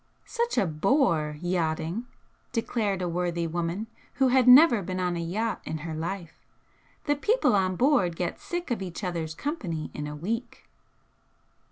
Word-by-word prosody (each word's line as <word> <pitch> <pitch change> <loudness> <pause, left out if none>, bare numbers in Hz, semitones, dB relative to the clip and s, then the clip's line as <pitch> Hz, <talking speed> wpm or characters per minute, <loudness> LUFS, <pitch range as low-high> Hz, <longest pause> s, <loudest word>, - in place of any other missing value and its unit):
"Such 470 0 -2
a - - +4
bore, 160 - +1
yachting!" 175 +4 -1 0.5
declared 215 -5 -1
a - - 0
worthy 170 0 -1
woman 170 +5 -2 0.3
who 265 -1 +3
had 255 0 +4
never 250 -3 +8
been 185 0 -4
on 180 -1 0
a - - -3
yacht 205 +7 -2
in 160 - -4
her 160 - -4
life 170 +1 -4 0.7
"The 290 - +2
people 430 - +2
on 185 -1 +1
board 240 - +3
get 175 0 -3
sick 350 -5 -5
of 230 - -1
each 185 +1 -6
other's 165 -4 -3
company 185 - -4
in 150 0 -5
a 150 - -6
week!" 225 +11 -4
185 Hz, 160 wpm, -27 LUFS, 165-240 Hz, 0.7 s, never